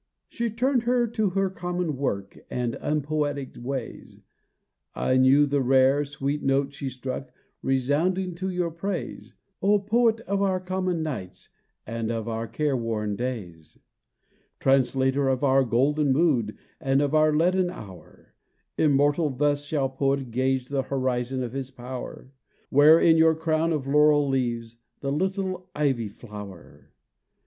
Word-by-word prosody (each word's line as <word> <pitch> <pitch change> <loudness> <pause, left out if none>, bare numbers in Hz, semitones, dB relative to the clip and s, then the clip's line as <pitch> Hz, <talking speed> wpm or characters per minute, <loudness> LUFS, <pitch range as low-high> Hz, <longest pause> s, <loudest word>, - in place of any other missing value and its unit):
She 235 -1 -2
turned 250 +3 +1
her 240 +1 +2
to 220 -3 0
her 195 +1 0
common 175 -3 -3
work 100 -8 -3
And 120 -2 -2
unpoetic 150 -2 -2
ways, 130 -2 -6 0.8
Nor 130 - +1
knew 135 +3 +5
the 140 0 0
rare, 135 +2 +4
sweet 145 0 -3
note 135 +1 +1
she 140 -1 -4
struck 130 +1 -6 0.3
Resounding 160 +8 0
to 185 +3 -4
your 180 -2 -1
praise, 180 +2 -5 0.3
O 205 +2 +4
Poet 225 +3 +2
of 200 -2 -2
our 190 -2 +1
common 185 -2 -2
nights, 125 -13 -6 0.4
And 115 0 -3
of 115 -1 -3
our 115 0 -3
care 140 +5 -1
worn 110 -4 -2
days! 100 -10 -6 0.8
Translator 135 +1 +2
of 130 +1 0
our 135 -1 +4
golden 135 +4 +2
mood, 130 -8 +1 0.2
And 135 -2 +1
of 145 0 0
our 155 0 +4
leaden 180 +4 +2
hour! 100 - -12 0.5
Immortal 145 +1 +3
thus 145 +2 0
shall 145 -2 0
poet 135 -1 -1
gauge 130 +1 0
The 140 -1 0
horizon 130 -1 -2
of 120 -1 -5
his 135 -1 -4
power. 130 0 -8 0.4
Wear 150 +4 +7
in 165 -1 +5
your 160 0 +5
crown 160 +1 0
of 150 -4 -1
laurel 150 +1 +4
leaves, 120 -3 -2 0.2
The 140 - -2
little 185 +2 -2
ivy 135 -7 0
flower! 105 -4 -11
140 Hz, 140 wpm, -25 LUFS, 130-165 Hz, 0.8 s, Wear